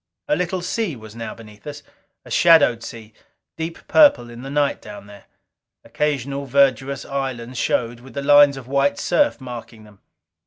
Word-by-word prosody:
A 300 - +2
little 180 0 -2
sea 190 -3 -2
was 110 -2 -12
now 115 -1 -6
beneath 105 +1 -15
us. 145 0 -8 0.4
A - - -13
shadowed 145 -9 +5
sea, 110 -1 -10 0.4
deep 165 +1 -7
purple 205 - +5
in 120 +1 -10
the 135 - -7
night 145 0 0
down 105 -1 -11
there. 100 -1 -15 0.6
Occasional 140 -2 -2
verdurous 135 0 +1
islands 130 -3 -4
showed, 120 0 -1
with 130 +3 -15
the 140 - -3
lines 145 -1 +6
of 130 -2 -10
white 140 -2 +1
surf 295 - +1
marking 120 -3 -9
them. 105 -2 -18
135 Hz, 165 wpm, -21 LUFS, 115-145 Hz, 0.6 s, lines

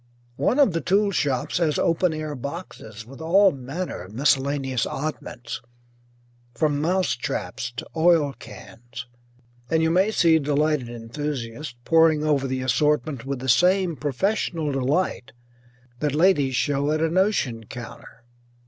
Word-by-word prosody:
One 255 - +1
of 275 - +4
the 165 - -1
tool 200 +5 +2
shops 140 -5 0
has 155 -4 +1
open 170 +1 +2
air 155 -1 -4
boxes 130 - -8
with 135 +5 -12
all 190 +4 +5
manner 140 - -5
of 95 +4 -11
miscellaneous 135 -1 +1
oddments, 135 -4 -5 0.9
from 145 +2 +1
mouse 180 -2 +1
traps 125 - -4
to - - -4
oil 160 -3 +3
cans, 120 0 -10 0.6
and 160 0 +2
you 160 - +2
may 185 +5 +3
see 165 -6 +4
delighted 145 -3 0
enthusiasts 120 +2 -5
poring 160 -2 +4
over 145 -3 +1
the 130 0 -2
assortment 140 0 0
with 140 0 -2
the 130 - -5
same 180 +6 +3
professional 150 - -1
delight 135 -3 -1 0.7
that 150 -1 -1
ladies 150 -6 +3
show 140 +2 0
at 155 - +1
a 165 - +2
notion 160 - 0
counter. 120 +1 -10
150 Hz, 140 wpm, -24 LUFS, 130-165 Hz, 0.9 s, all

